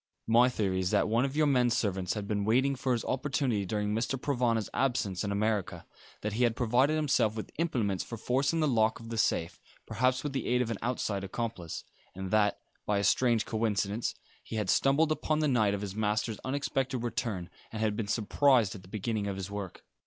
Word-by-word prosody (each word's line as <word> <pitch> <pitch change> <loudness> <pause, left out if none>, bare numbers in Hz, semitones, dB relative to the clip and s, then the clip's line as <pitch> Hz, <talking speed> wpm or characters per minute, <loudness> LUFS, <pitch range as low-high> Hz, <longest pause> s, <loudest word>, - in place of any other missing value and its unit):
My 120 +3 +5
theory 100 -6 -1
was 95 -1 0
that - - +2
one 115 +4 +2
of 135 +1 -4
your 155 0 +3
men 125 -4 +3
servants 95 -5 0
had 105 -2 -4
been 105 -1 0
waiting 130 +6 +2
for 130 0 0
his 115 - -2
opportunity 130 -7 0
during 105 +1 -1
Mr. 120 +4 -1
Provana's 120 -6 0
absence 115 -9 0
in 100 - -2
America; 105 -1 -1 0.4
that 105 -1 -2
he 115 - -1
had 115 -2 +2
provided 130 +4 +2
himself 140 -8 +2
with 110 - -6
implements 110 - 0
for 115 - -7
forcing 135 +8 +1
the 155 - +3
lock 110 -4 +2
of 115 0 -10
the 115 - -4
safe, 85 -4 0 0.2
perhaps 130 +1 +1
with 145 -2 -3
the 135 -4 -2
aid 125 0 +2
of 115 - -4
an 110 - -3
outside 110 -4 -2
accomplice, 95 -4 -4 0.3
and 95 0 -5
that, 105 -1 +3 0.3
by 105 - +2
a 100 - 0
strange 115 +2 +3
coincidence, 110 -1 -1 0.3
he - - -7
had 105 -4 +1
stumbled 150 +4 +3
upon 155 0 0
the 155 -1 +2
night 110 -7 +2
of 100 - -5
his 100 -2 -4
master's 110 0 -1
unexpected 135 0 -1
return, 105 -7 -3 0.2
and 110 - -5
had 110 -1 +1
been 105 -1 -3
surprised 115 0 +3
at 100 - -9
the 90 - -16
beginning 105 +1 -2
of 100 - -2
his 95 +1 -6
work. 100 -3 -6
115 Hz, 210 wpm, -30 LUFS, 100-130 Hz, 0.4 s, My